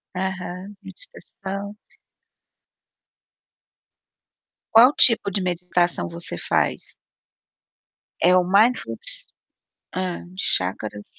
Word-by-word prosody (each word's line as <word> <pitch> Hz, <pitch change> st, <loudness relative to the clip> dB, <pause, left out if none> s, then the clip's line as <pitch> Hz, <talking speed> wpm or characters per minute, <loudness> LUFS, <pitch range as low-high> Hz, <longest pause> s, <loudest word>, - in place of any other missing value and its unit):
Aham, 185 Hz, +1 st, -5 dB
meditação. 200 Hz, +1 st, -9 dB, 3.0 s
Qual 245 Hz, +5 st, +7 dB
tipo 225 Hz, -4 st, +6 dB
de 195 Hz, -, -2 dB
meditação 175 Hz, -1 st, -1 dB
você 170 Hz, -, -6 dB
faz? -, -, -1 dB, 1.3 s
É 180 Hz, +2 st, +5 dB
o 180 Hz, -, +4 dB
mindfulness? 250 Hz, -, 0 dB, 0.7 s
Hã, 185 Hz, -1 st, -4 dB
chacras? 105 Hz, -, -1 dB
185 Hz, 70 wpm, -22 LUFS, 175-205 Hz, 3.0 s, Qual